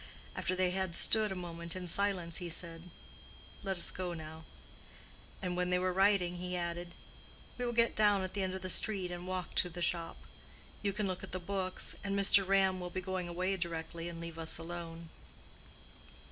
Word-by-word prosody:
After 185 - 0
they 185 -1 +2
had 190 -2 -1
stood 215 -2 +6
a - - -2
moment 170 -1 -4
in 185 -1 -4
silence 180 -3 0
he 175 -2 -4
said, 165 +1 -7 0.7
"Let 195 -2 -1
us 175 - +2
go 180 -2 -3
now," 160 0 -8 1.0
and 180 -1 -1
when 180 0 +1
they 180 - +3
were 185 0 +1
riding 190 -2 +4
he 180 0 -3
added, 175 0 -3 0.6
"We 245 - 0
will - - 0
get 235 0 +3
down 205 -2 +5
at 185 - -4
the 200 - -1
end 190 0 -1
of 190 - -6
the 185 - -2
street 190 -4 +2
and 175 +1 -5
walk 185 -1 -3
to 180 - +3
the 175 +1 -8
shop. 170 -1 0 0.6
You 200 - +1
can 210 +1 -1
look 185 -2 -2
at - - -8
the 185 - -1
books, 185 0 -1
and 200 0 0
Mr. 195 -1 +5
Ram 190 -1 +4
will 180 0 -4
be 185 - -3
going 185 -1 -2
away 185 +3 0
directly 170 -1 -3
and 170 -1 -7
leave 170 -1 -6
us 160 0 +2
alone." 165 0 -6
180 Hz, 200 wpm, -34 LUFS, 170-190 Hz, 1.0 s, stood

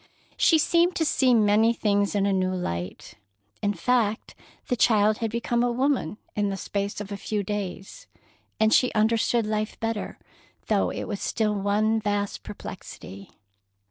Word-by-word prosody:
She 325 - +4
seemed 340 +3 +2
to 320 - +1
see 260 -4 +3
many 220 +1 +4
things 205 -2 0
in 200 -1 +2
a 200 - +2
new 185 0 0
light. 90 - -5 0.4
In 205 0 0
fact, 220 +3 0 0.3
the 250 - +1
child 215 -2 +3
had 225 - -1
become 235 +1 -1
a 245 0 +2
woman 255 - 0 0.2
in 205 -1 0
the 195 - -3
space 200 +1 -3
of 205 0 -8
a 200 - -4
few 205 +1 -2
days, 200 - -5 0.5
and 220 0 +4
she 250 - +4
understood 225 +1 +2
life 215 0 -2
better, 225 -2 -3 0.5
though - - +1
it - - -4
was 205 -3 -5
still 215 -2 0
one 210 +2 +1
vast 205 -1 -2
perplexity. 95 +2 -9
210 Hz, 160 wpm, -25 LUFS, 200-230 Hz, 0.5 s, She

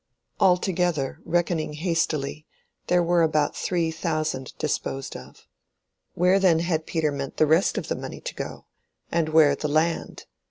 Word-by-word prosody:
Altogether, 175 -5 +1
reckoning 165 -2 0
hastily, 155 -2 -1 0.4
here 180 -1 +3
were 170 0 +3
about 155 -2 +2
three 170 -3 -1
thousand 155 -5 -3
disposed 135 -2 -3
of. - - -12 0.7
Where 180 +3 +4
then 180 -4 +4
had 165 -1 -1
Peter 160 -2 0
meant 140 -1 -5
the 155 - +5
rest 160 +5 +3
of - - -3
the - - -1
money - - -7
to - - -6
go—and 165 -2 -5
where 155 -3 +5
the 150 - -3
land? 155 +3 -1
160 Hz, 145 wpm, -25 LUFS, 155-175 Hz, 0.7 s, the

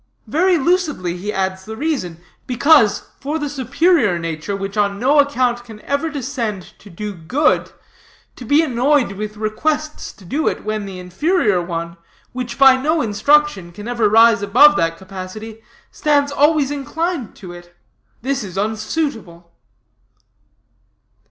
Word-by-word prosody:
Very 360 +3 +2
lucidly 300 - 0
he 195 +4 -4
adds 190 -1 -2
the 220 +2 -8
reason: 260 - -3 0.3
Because, 250 -3 +3
for 295 +3 -3
the 295 -2 -3
superior 280 - +1
nature, 165 +3 -4
which 195 +1 -5
on 200 -1 +1
no 280 +5 +3
account 255 -4 +1
can 220 -3 -12
ever 280 +3 -1
descend 240 - -4
to 205 - -15
do 205 +4 -6
good, 240 - 0 0.6
to - - -10
be 290 +7 +3
annoyed 260 -2 +1
with 210 +2 -6
requests 300 +8 -2
to 195 - -18
do 290 - -1
it, - - -2
when 215 -1 -3
the 190 -1 -8
inferior 195 - 0
one, 170 0 -5 0.4
which 245 -1 -5
by 265 -1 +7
no 315 +4 +1
instruction 220 -3 +2
can 205 +5 -9
ever 235 -3 +1
rise 225 -1 +5
above 260 +9 +6
that 165 0 0
capacity, 195 +4 -9 0.3
stands 290 -6 +1
always 290 0 +2
inclined 290 - -3
to 180 -3 -10
it 175 0 -14 0.5
this 270 -1 -1
is 190 -2 -8
unsuitable." 215 - -3
230 Hz, 145 wpm, -19 LUFS, 195-290 Hz, 0.6 s, by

